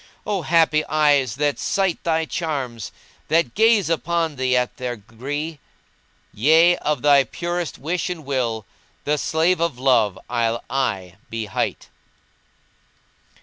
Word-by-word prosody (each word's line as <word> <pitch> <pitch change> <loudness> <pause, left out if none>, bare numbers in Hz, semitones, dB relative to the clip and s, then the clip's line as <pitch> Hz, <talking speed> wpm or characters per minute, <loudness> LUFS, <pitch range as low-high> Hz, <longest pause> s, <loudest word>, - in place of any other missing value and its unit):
O 205 -3 -1
happy 155 0 +3
eyes 145 -6 +2
that 145 0 0
sight 195 -4 0
thy 160 -1 +1
charms 135 - -4 0.2
* - - -32
That 155 -6 +2
gaze 220 -2 +4
upon 165 -1 -1
thee 130 -1 +1
at 125 0 -1
their 125 -1 -3
gree! 140 +8 -6 0.7
Yea, 160 +9 +5
of 150 0 -2
my 140 -2 +6
purest 175 +4 -4
wish 165 +6 -2
and 165 -5 -6
will 120 -6 -2 0.2
* - - -37
The 150 0 +1
slave 165 +5 +1
of 170 -7 0
Love 120 -7 +2
I'll 115 -1 -1
aye 95 -9 -2
be 115 -1 -4
hight." 105 - -3
145 Hz, 140 wpm, -22 LUFS, 125-165 Hz, 0.7 s, my